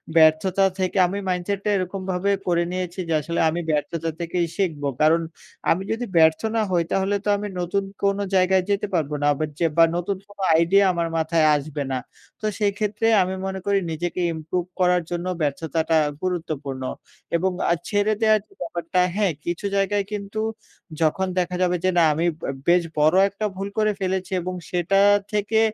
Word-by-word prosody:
ব্যর্থতা 165 +4 +4
থেকে 185 +1 -1
আমি 195 +3 -3
মাইন্ডসেট 185 +2 -1
টা - - +2
এরকমভাবে 185 +1 -2 0.2
করে 170 -1 +2
নিয়েছি 180 0 -4
যে, 165 - 0
আসলে 170 +3 -3
আমি 170 +2 -2
ব্যর্থতা 160 +2 -1
থেকেই 170 +1 -1
শিখব। 165 -7 -1 0.2
কারণ 160 +2 +4 0.5
আমি 180 +4 +1
যদি 230 +2 -2
ব্যর্থ 160 -1 +5
না 225 - +2
হই 175 -2 +2
তাহলে 195 +1 +1
তো - - +1
আমি 210 - -4
নতুন 180 +3 -1 0.2
কোনো 200 0 +2
জায়গায় 185 0 +4
যেতে 200 0 0
পারব 155 -4 0
না - - +1
আবার 155 +2 -2
যে 170 - +2
বা 165 - +8
নতুন 180 +2 -2
কোনো 205 -1 -12
আইডিয়া 190 +5 +4
আমার 170 -1 -1
মাথায় 160 0 +2
আসবে 145 0 -3
না। 130 - 0 0.4
তো - - -4
সেই 205 -2 +2
ক্ষেত্রে 210 +1 0
আমি 185 +1 -1
মনে 190 0 -3
করি 200 -1 +2
নিজেকে 175 +3 -3
ইমপ্রুভ 165 +3 -3
করার 180 -1 +3
জন্য 175 0 -3 0.2
ব্যর্থতাটা 160 +2 0 0.2
গুরুত্বপূর্ণ 155 -7 -3 0.5
এবং 185 +3 +1 0.2
আ - - +6 0.2
ছেড়ে 205 +1 +2
দেয়ার 215 -1 +5
যে - - -23
ব্যাপারটা, 170 +1 -2 0.2
হ্যাঁ 200 -4 +1
কিছু 175 +3 -3
জায়গায় 200 +1 +1
কিন্তু 205 +1 -4 0.6
যখন 165 +4 +2
দেখা 180 0 -1
যাবে 180 0 +2
যে, 185 - +3
"না 170 - +6
আমি 165 +3 0 0.2
বা - - -3 0.2
বেশ 175 +1 +5 0.2
বড় 155 +3 +4
একটা 200 +2 -4
ভুল 195 +1 -4
করে 215 -1 +3
ফেলেছি 190 0 -2
এবং 185 +2 -4 0.2
সেটা 180 +2 +1 0.3
থেকে 210 +1 +1
180 Hz, 180 wpm, -23 LUFS, 165-195 Hz, 0.6 s, বা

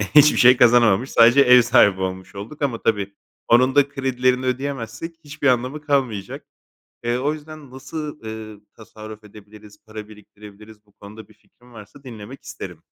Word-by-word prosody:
hiçbir 150 0 +6
şey 125 0 +6
kazanamamış 120 0 +3
sadece 120 +4 +5
ev 125 -1 +6
sahibi 105 -5 +3
olmuş 95 +1 -6
olduk 110 +10 -10
ama 125 -5 -2
tabii, 100 -2 -2 0.3
onun 130 +3 +3
da 140 -1 +3
kredilerini 130 -2 -1
ödeyemezsek, 130 +3 -5
hiçbir 145 -1 -4
anlamı 130 +4 0
kalmayacak. 130 -10 -3 0.6
Eee, 120 +1 -1
o 145 +4 -1
yüzden 155 -3 -12
nasıl, 150 +3 -8
eee, 110 -1 -9 0.2
tasarruf 110 -1 -12
edebiliriz, 105 0 -16
para 110 -1 -10
biriktirebiliriz, 105 0 -16
bu 100 - -31
konuda 105 +1 -14
bir 110 - -21
fikrin 120 +3 -25
varsa 110 +6 -15
dinlemek 120 +1 -11
isterim. - - -10
120 Hz, 155 wpm, -20 LUFS, 105-135 Hz, 0.6 s, hiçbir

